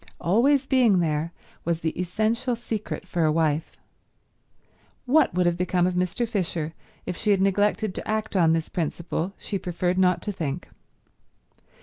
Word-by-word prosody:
Always 260 +10 +3
being 250 -7 +4
there 160 -1 0 0.3
was 170 0 -1
the 160 - 0
essential 220 +8 -1
secret 220 -4 -5
for 175 -2 0
a 155 - +3
wife. 155 0 0 1.3
What 300 +5 +4
would 180 0 +2
have 175 0 +2
become 180 0 +1
of 180 - +1
Mr. 180 +6 0
Fisher 170 -7 -2 0.3
if - - -3
she 210 - -2
had 200 -2 +4
neglected 205 +1 +1
to - - -6
act 215 0 -2
on 165 -3 +4
this 165 -1 0
principle 170 +2 -3
she 200 - -4
preferred 180 +1 -1
not 180 -2 +3
to 210 - -2
think. 165 -4 -4
180 Hz, 155 wpm, -25 LUFS, 170-215 Hz, 1.3 s, being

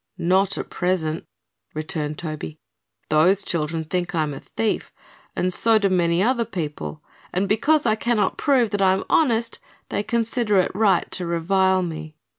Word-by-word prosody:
"Not 190 +3 +2
at - - -6
present," 170 -3 -1 0.5
returned 155 -1 -3
Toby. 155 -1 -6 0.5
"Those 180 +6 +4
children 160 -2 -2
think 175 +2 -3
I 160 - +2
am 150 -1 -3
a 135 - -7
thief, 225 -2 -2 0.4
and 185 0 +1
so 225 +4 +4
do 200 -2 +2
many 175 0 +2
other 240 +1 +2
people, 160 -7 -5 0.3
and 190 +2 0
because 280 +9 +2
I 220 - +4
cannot 230 -1 0
prove 255 -6 +2
that 205 -1 -1
I 190 -1 +5
am 190 - -2
honest 235 -6 +2 0.3
they - - -1
consider 230 -1 0
it 185 - +2
right 200 -3 +3
to 180 -2 -3
revile 190 +2 +2
me." 160 -2 -6
185 Hz, 165 wpm, -23 LUFS, 165-215 Hz, 0.5 s, I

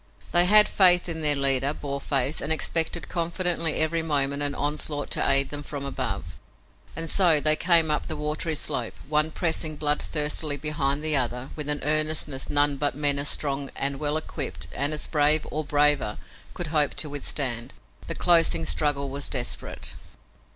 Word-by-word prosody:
They 175 0 +6
had 210 +3 +7
faith 180 -2 +5
in 165 -2 -4
their 150 -1 +4
leader, 140 +1 +1
Boarface, 140 0 -3
and 155 - -3
expected 165 +1 -1
confidently 170 -1 -1
every 160 +1 +1
moment 140 -3 0
an 145 -1 -1
onslaught 145 0 -1
to - - +1
aid 135 0 +3
them 145 0 -5
from 145 -1 -6
above. 140 - -5 0.6
And 165 0 -4
so 170 -3 +4
they 155 +1 +4
came 165 -1 +3
up 150 - 0
the 160 - -4
watery 150 +2 -3
slope, - - -1
one 150 +1 +1
pressing 160 -1 -1
blood 150 0 -1
thirstily 150 -1 -1
behind 145 0 -2
the 155 -1 +4
other 125 0 -2
with 150 -1 -5
an 145 0 -2
earnestness 155 -2 +1
none 145 -1 +2
but 145 -1 -1
men 145 -1 +2
as 140 0 -1
strong 140 -1 -1
and 140 0 -2
well 150 0 -1
equipped 155 -3 -4
and 140 +2 -2
as 150 -1 0
brave 150 0 +2
or 155 +1 -3
braver 145 -7 +1 0.4
could 175 -3 -3
hope 150 -2 +2
to 155 - -2
withstand. 135 -4 -3 0.3
The - - -4
closing 165 - +3
struggle 140 - 0
was 140 +1 -4
desperate. 125 -3 -3
150 Hz, 170 wpm, -24 LUFS, 140-155 Hz, 0.6 s, had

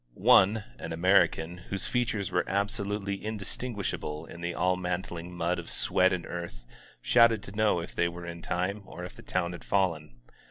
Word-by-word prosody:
One, 105 +3 +5 0.2
an - - -5
American, 90 -1 +3
whose 100 -1 -2
features 115 -5 -1
were 90 - +2
absolutely 100 0 -1
indistinguishable 105 -6 -3
in 85 - -11
the 85 0 -3
all 90 +1 +2
mantling 90 -1 -4
mud 85 0 -1
of 85 - -8
sweat 95 +1 +3
and 90 -2 -2
earth, 85 -9 -6 0.4
shouted 115 -3 +5
to - - -7
know 105 -5 +3
if - - -8
they 85 - +2
were 85 0 -7
in 85 0 -7
time, 95 +5 -2
or 90 +3 -7
if - - -10
the - - -12
town 85 -1 -1
had 85 -2 -8
fallen. 80 -10 0
90 Hz, 175 wpm, -29 LUFS, 85-100 Hz, 0.4 s, One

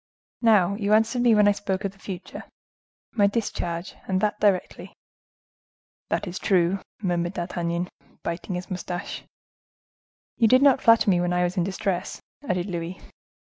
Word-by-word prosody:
Now, 205 -5 +4
you 205 -1 +1
answered 225 +3 +2
me 240 -2 +5
when 210 -1 +5
I - - +6
spoke 200 -1 -3
of 195 - -1
the 195 - -24
future, 190 -2 -8 0.7
'My 205 -3 +3
discharge,—and 185 -3 -3
that 210 +1 0
directly.'" 200 -3 0 1.2
"That - - -1
is 180 -1 -5
true," 185 -1 +2 0.2
murmured 175 -1 0
D'Artagnan, 170 0 -2 0.4
biting 170 +2 -4
his 180 +1 -6
mustache. 180 +1 -5 1.2
"You 230 - +4
did 255 +4 +5
not 280 -3 +5
flatter 230 -1 +5
me 175 -1 +2
when 175 0 0
I 180 0 +2
was 180 +1 -1
in 180 - +1
distress," 190 0 -2 0.2
added 180 -11 -1
Louis. 175 -1 -5
190 Hz, 150 wpm, -25 LUFS, 175-210 Hz, 1.2 s, I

